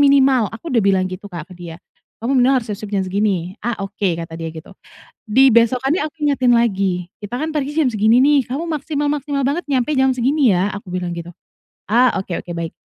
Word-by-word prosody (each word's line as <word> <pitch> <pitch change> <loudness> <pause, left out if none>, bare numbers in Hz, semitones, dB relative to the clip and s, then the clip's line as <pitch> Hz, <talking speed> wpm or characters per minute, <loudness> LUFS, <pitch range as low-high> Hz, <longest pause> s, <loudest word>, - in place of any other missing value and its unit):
minimal," 270 -5 +4
aku 235 +9 -8
udah 230 -3 +3
bilang 190 -2 +2
gitu, 185 +2 -8
Kak, 170 -1 -7
ke - - -11
dia, 170 -2 -9 0.4
"kamu 255 +4 0
minimal 255 +2 +4
harus 225 - -12
siap-siap 210 0 -7
jam 195 - +2
segini," 190 -1 -1
"ah, 240 -1 -1
oke," 195 -2 -1
kata 165 0 -7
dia 165 -1 -5
gitu. 160 +4 -11 0.6
Dibesokannya 255 - +4
aku 310 - -17
ingetin 260 -4 +2
lagi, 195 -6 0 0.2
"kita 210 +4 -5
kan 315 - -1
pergi 290 -1 -1
jam - - +3
segini 220 +3 +4
nih, 290 0 +5
kamu 280 +7 -3
maksimal-maksimal 290 -2 -2
banget 315 +6 -1
nyampe 275 +2 +1
jam 265 0 +4
segini 265 +2 +2
ya," 185 +3 +1
aku 200 -2 -8
bilang 180 -1 -3
gitu, 170 0 -7 0.6
"ah 245 +3 +5
oke 185 -2 -4
oke - - -12
baik." 165 -1 -4
230 Hz, 200 wpm, -19 LUFS, 190-270 Hz, 0.6 s, nih